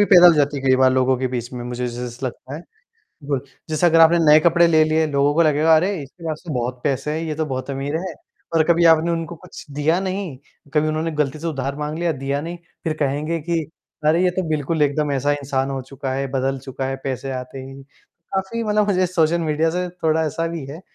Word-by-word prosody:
भी - - +6
पैदा 180 -1 +10
हो 175 - +8
जाती 145 -1 +1
है 135 - -5
कई 130 - +5
बार 130 0 +5
लोगों 130 0 +2
के 130 - 0
बीच 120 0 -4
में 120 -1 -6
मुझे 125 0 -3
जै 120 0 -5
जैसा 125 +2 -5
लगता 130 +2 -8
है। - - -8 0.7
कुछ 140 -1 -2 0.2
जैसा 155 +3 +2
अगर 165 -1 +5
आपने 165 +1 +6
नए 155 -2 +7
कपड़े 170 +1 +4
ले 160 -2 +4
लिए, 155 0 +2
लोगों 145 0 +1
को 170 - +4
लगेगा 155 +1 +4
अरे! 185 +6 +1
इसके 140 +5 -13
पास 155 0 -4
तो 160 - -4
बहुत 125 0 -3
पैसे 145 0 -1
हैं, 155 +2 -2
ये 155 - -2
तो 155 +1 -2
बहुत 130 -1 -4
अमीर 140 +2 -2
है। 185 +2 -5 0.4
पर 165 -1 +4
कभी 170 0 +2
आपने 160 +2 +1
उनको 165 0 -3
कुछ - - -12
दिया 160 +4 +2
नहीं, 190 -5 -3 0.4
कभी 155 0 +3
उन्होंने 155 +1 -1
गलती 150 -1 -1
से 165 - -5
उधार 140 -3 -3
माँग 150 +1 -4
लिया, 170 -1 +1
दिया 140 +1 -1
नहीं, 170 +3 -6 0.3
फिर 160 - 0
कहेंगे 150 +4 -1
कि, 170 +2 -1 0.5
अरे! 165 +3 +4
ये 180 - +4
तो 185 - +2
बिल्कुल 155 +1 0
एकदम 145 0 +1
ऐसा 140 +1 +1
इंसान 140 -2 -2
हो 135 -1 -3
चुका 135 -1 -4
है, 135 +1 -1
बदल 135 0 0
चुका 130 +1 -4
है 135 0 -2
पैसे 135 0 -3
आते 130 +1 -6
ही, 135 +1 -10 0.5
काफ़ी 195 +5 -2
मतलब 210 -1 +2
मुझे 185 -2 +2
सोशल 170 -2 +2
मीडिया 160 0 +1
से 180 +2 -2
थोड़ा 160 -2 0
ऐसा 165 +3 -2
भी 165 -3 -5
है। 155 +4 -8
150 Hz, 240 wpm, -21 LUFS, 135-165 Hz, 0.7 s, पैदा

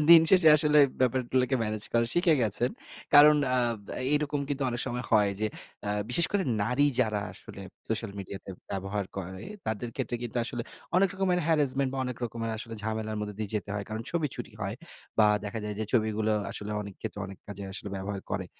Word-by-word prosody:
দিন 165 -1 +11
শেষে 185 -4 +7
আসলে 150 0 +4 0.2
ব্যাপারগুলোকে 130 +1 +2
ম্যানেজ 110 -1 -2
করা 115 0 +3
শিখে 175 -2 +4
গেছেন। 115 +4 +1 0.4
কারণ 150 +1 +9
অ্যা 125 0 +3 0.3
ব্যা - - -6 0.2
এরকম 145 -1 0
কিন্তু 140 -1 -2
অনেক 120 0 -2
সময় 125 +1 -3
হয় 105 -2 +5
যে 110 - +2 0.4
অ্যা 105 - 0 0.2
বিশেষ 170 +7 +4
করে 200 -2 +2 0.2
নারী 125 +7 +3
যারা 105 -2 +1
আসলে 100 - -11 0.3
সোশ্যাল 110 -1 -1
মিডিয়াতে 95 0 -7 0.2
ব্যবহার 100 +1 -2
করে, 95 0 -6 0.2
তাদের 110 +2 -2
ক্ষেত্রে 120 - -1
কিন্তু 120 0 -5
আসলে 120 -1 -3 0.3
অনেক 190 +1 +5
রকমের 185 -2 +1
harrasment 140 -4 +2
বা, 135 - -3
অনেক 125 -2 -4
রকমের 115 0 -3 0.3
ঝামেলার 110 0 -2
মধ্যে 105 -1 -4
দিয়ে 105 -2 -3
যেতে 105 -1 -2
হয়। 100 - -3
কারণ 110 +1 -4
ছবি 170 -3 +1
চুরি 120 -2 -7
হয়। 100 +1 -2 0.4
বা, 110 - +7 0.2
দেখা 105 +2 -4
যায় 105 -1 -3
যে 110 - -1
ছবিগুলো 110 -2 +2 0.2
আসলে 105 0 -5
অনেকক্ষেত্রে 105 +1 -7
অনেক 95 -1 -10
কাজে 100 -1 -7
আসলে 100 - -5
ব্যবহার 100 +1 -4
করে। 95 -2 -2
115 Hz, 185 wpm, -29 LUFS, 105-135 Hz, 0.4 s, দিন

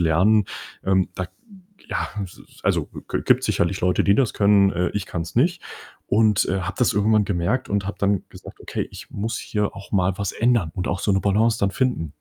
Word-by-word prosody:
lernen. 95 +6 +4 0.4
Ähm, 95 -1 +2
da 95 -1 -4 0.6
ja, - - -1 0.2
s 90 - -12
s - - -19
also, - - +1 0.2
g - - -1
gibt's - - +4
sicherlich 95 +3 0
Leute, 90 0 +2
die 100 - +5
das 130 -2 +2
können. 100 -1 +4
Äh, 90 0 0
ich 105 -2 -1
kann's 85 -1 -5
nicht. 170 +8 +2 0.5
Und, 105 -2 +3
äh, 95 +1 0
habe 95 +2 -4
das 125 - +3
irgendwann 105 0 +3
gemerkt 100 +7 -1
und 100 -1 -1
habe 105 - -4
dann 100 -1 +1
gesagt: - - -12
„Okay, - - -4
ich - - -11
muss 115 +3 -3
hier 105 -2 -2
auch 100 - -11
mal 95 -2 +2
was 100 -2 -2
ändern 115 -8 +2
und 90 - -3
auch 90 - -1
so 100 - +1
'ne 95 - +2
Balance 110 +3 +2
dann 100 - +1
finden.“ 110 - -1
100 Hz, 210 wpm, -23 LUFS, 95-110 Hz, 0.6 s, die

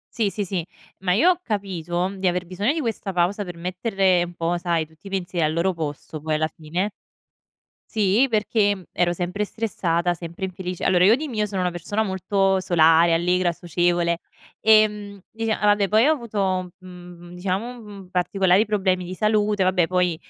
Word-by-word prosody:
Sì, 220 -3 +1
sì, 205 +1 -3
sì, 180 -3 -3 0.3
ma 185 -1 0
io 245 - +5
ho 360 - 0
capito 185 - -2
di 190 0 -2
aver 180 0 0
bisogno 195 +8 -1
di 320 - -2
questa 225 -6 -3
pausa 185 +3 0
per 175 -1 -8
mettere 185 0 +1
un 175 0 -9
po', 170 +1 -1
sai, 170 -2 0
tutti 160 +4 -21
i - - -7
pensieri 180 -3 -2
al 155 - -1
loro 170 +4 +1
posto 155 -1 -6
poi 155 +1 -1
alla 155 +1 0
fine. 170 +6 -3 1.0
Sì 215 +4 +3
perché, 210 -2 +2
mhmm, 185 - -13
ero 175 0 +1
sempre 180 +4 -2
stressata, 175 -6 -1
sempre 170 +2 -7
infelice. 185 -1 -5
Allora 180 -1 +3
io 215 +5 +6
di 305 +4 -4
mio 220 -7 -1
sono 195 -2 -3
una 180 -1 0
persona 195 +6 -2
molto 190 0 +1
solare, 165 -2 +4
allegra, 180 +1 +2
socievole, 175 0 0 0.4
ehm, 210 -2 +3
dicia 225 -1 -2
vabbè 205 -1 +3
poi 220 +5 +4
ho 310 - +5
avuto, 195 - -2
mhmm, 180 -1 -12
diciamo, 195 +7 -3
mhmm, 200 -4 -11
particolari 190 +2 +3
problemi 190 -4 0
di 180 +1 -6
salute, 210 -1 +1
vabbè 180 -2 +2
poi 180 -2 +1
185 Hz, 180 wpm, -23 LUFS, 175-205 Hz, 1.0 s, io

